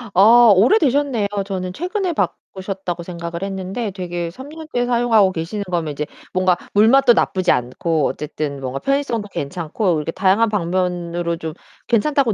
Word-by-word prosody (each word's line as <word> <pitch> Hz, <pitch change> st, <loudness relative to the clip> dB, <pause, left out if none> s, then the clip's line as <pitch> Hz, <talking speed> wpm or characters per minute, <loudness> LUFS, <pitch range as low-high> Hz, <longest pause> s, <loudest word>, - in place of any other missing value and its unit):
어 230 Hz, +3 st, +7 dB
오래되셨네요. 265 Hz, -, +3 dB, 0.2 s
저는 185 Hz, -2 st, -4 dB
최근에 365 Hz, -, -2 dB
바꾸셨다고 190 Hz, -, -4 dB
생각을 170 Hz, 0 st, -6 dB
했는데 195 Hz, +3 st, -4 dB
되게 175 Hz, -2 st, -4 dB
3 260 Hz, +9 st, -11 dB
년째 310 Hz, -6 st, -3 dB
사용하고 230 Hz, -5 st, +3 dB
계시는 185 Hz, +5 st, -4 dB
거면 165 Hz, -3 st, -1 dB
이제 150 Hz, +1 st, -3 dB, 0.3 s
뭔가 185 Hz, -1 st, +2 dB, 0.2 s
물맛도 240 Hz, +4 st, +5 dB
나쁘지 185 Hz, -5 st, +1 dB
않고, 145 Hz, +6 st, 0 dB
어쨌든 150 Hz, -2 st, -4 dB
뭔가 130 Hz, +1 st, -4 dB
편의성도 275 Hz, -6 st, -1 dB
괜찮고, 170 Hz, +4 st, -2 dB
이렇게 150 Hz, +2 st, -3 dB
다양한 200 Hz, +5 st, +2 dB
방면으로 175 Hz, -3 st, -1 dB
좀 160 Hz, -2 st, -6 dB, 0.3 s
괜찮다고 250 Hz, 0 st, +2 dB
190 Hz, 365 characters per minute, -20 LUFS, 170-235 Hz, 0.3 s, 어